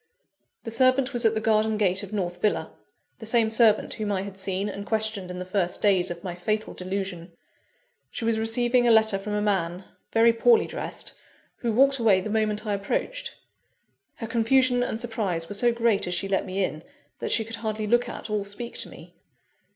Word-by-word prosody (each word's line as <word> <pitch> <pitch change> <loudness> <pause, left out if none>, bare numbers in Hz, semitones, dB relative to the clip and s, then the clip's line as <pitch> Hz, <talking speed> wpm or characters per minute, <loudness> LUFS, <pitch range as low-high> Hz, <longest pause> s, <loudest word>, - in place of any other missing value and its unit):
_ - - -52
The 225 - -4
servant 255 +3 +3
was 240 -1 -1
at 225 0 +4
the - - +1
garden 220 0 +2
gate 190 -2 +1
of 200 -1 -9
North 180 -4 -3
Villa 210 - 0 0.5
the 220 - -8
same 225 -1 +2
servant 220 -2 +3
whom 210 -1 -3
I 190 -1 -1
had 200 -1 -8
seen 190 +1 -2
and 200 0 -5
questioned 215 -3 -2
in 180 - -6
the 180 - -5
first 185 -2 -1
days 190 -3 +3
of 170 0 -7
my 180 - -4
fatal 215 +5 -2
delusion. 185 -2 -5 0.8
She 230 - -5
was 225 -1 +1
receiving 240 +2 +2
a - - +6
letter 220 -3 +4
from 210 +1 -5
a 210 0 0
man, 185 -3 -1 0.3
very 230 +1 +5
poorly 445 - +4
dressed, - - -5 0.4
who 235 - -1
walked 270 +4 +4
away 215 -5 +4
the 205 +3 -5
moment 215 0 0
I 210 - -1
approached. 475 - -3 0.8
Her 225 - -6
confusion 245 +2 +2
and 235 -2 -2
surprise 210 -8 -2
were 205 - -6
so 240 +4 +2
great 230 -5 +1
as 180 - 0
she 195 +3 0
let 195 -1 0
me 190 +1 -1
in, 155 -3 -3 0.4
that - - -3
she 225 - +3
could 225 +1 -6
hardly 215 -1 -3
look 240 +3 +2
at, - - -7
or 210 -2 -1
speak 205 +4 -6
to - - -2
me. - - -14
215 Hz, 205 wpm, -26 LUFS, 195-230 Hz, 0.8 s, a